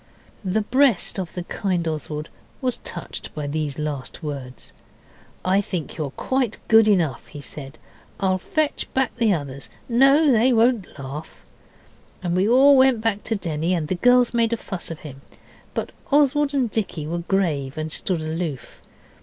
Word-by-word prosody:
The 195 +3 +1
breast 255 -5 +2
of 180 -3 -5
the 180 - -4
kind 180 -2 -2
Oswald 150 0 -4 0.3
was 255 -3 -1
touched - - -7
by 150 -2 -3
these 145 -1 -2
last 150 -1 -5
words. 135 -4 -7 0.7
'I 190 +2 +3
think 180 -6 -5
you're 155 -4 -3
quite 250 - -1
good 225 -1 +6
enough,' 170 - +1
he 150 - -10
said. 140 0 -9 0.4
'I'll 185 -1 +1
fetch 305 - -1
back 265 -2 +1
the 230 -3 +3
others 140 - -3 0.2
no, 275 +5 +5
they 245 +2 +4
won't 230 -6 +2
laugh.' 140 +3 -8 0.8
And 175 -1 0
we 190 +4 +2
all 275 +4 +7
went 260 -3 +5
back 220 -2 0
to 225 - 0
Denny, 170 -2 -1
and 155 -3 -2
the - - +1
girls 245 +6 +4
made 230 -1 +2
a - - 0
fuss 190 -5 -6
with 165 -2 -7
him. 135 -3 -10 0.5
But - - -2 0.2
Oswald 290 0 +3
and 250 -5 +1
Dicky 185 -8 -2
were 170 +3 -2
grave 160 -7 -1
and 155 0 -3
stood 175 +1 -1
aloof. 155 -3 -4
185 Hz, 165 wpm, -23 LUFS, 155-235 Hz, 0.8 s, all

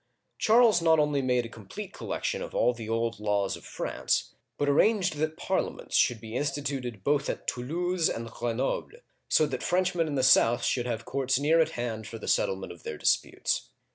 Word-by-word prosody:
Charles 220 -4 +5
not 160 -1 +5
only 150 -2 +2
made 125 -2 +1
a - - -5
complete 115 - -9
collection - - -3
of - - -7
all 125 - +3
the 115 -2 -8
old 115 -1 -1
laws 105 -2 0
of - - -13
France, - - -2 0.2
but 145 - 0
arranged 185 +3 +3
that 155 +1 -2
Parliaments - - -2
should 120 - +3
be 110 +1 -8
instituted 135 -6 -3
both 145 +2 +1
at - - -4
Toulouse 170 +7 -1
and 115 0 -4
Greno'ble, 120 - -3 0.3
so 155 - +4
that 130 -4 -4
French 180 +1 +1
men 165 -2 0
in 145 - -3
the 130 - +1
south 120 -2 +5
should 125 -1 0
have 115 -2 -3
courts 135 -1 0
near 155 +4 +3
at 160 - +2
hand 115 -3 -3
for 115 - -7
the 110 - -9
settlement 95 0 0
of 85 - -12
their - - -6
disputes. - - 0
135 Hz, 195 wpm, -28 LUFS, 115-165 Hz, 0.3 s, Charles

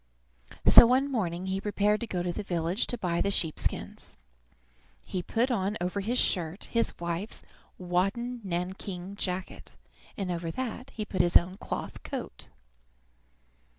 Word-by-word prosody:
So 235 - +10
one 265 +3 +2
morning 180 -7 -1
he 190 +1 -1
prepared 210 0 +1
to 235 - -3
go 180 -4 -2
to 175 -1 -1
the - - -3
village 175 +1 -1
to 245 - -2
buy 175 -5 0
the 200 - +2
sheep 165 -5 +1
skins. - - -3 0.9
He 185 - -3
put 235 +8 0
on 205 -2 0
over 180 +3 -1
his 235 +5 -1
shirt 175 -3 +1
his 230 0 0
wife's 170 +4 -3 0.3
wadded 195 +7 -1
nankeen 185 +1 -4
jacket, 185 -2 -4 0.4
and 190 -3 -2
over 170 -1 -3
that 255 +6 -4
he 215 - -3
put 190 -3 +1
his 175 0 +6
own 180 +2 -2
cloth - - -5
coat. - - -6
190 Hz, 150 wpm, -29 LUFS, 175-215 Hz, 0.9 s, So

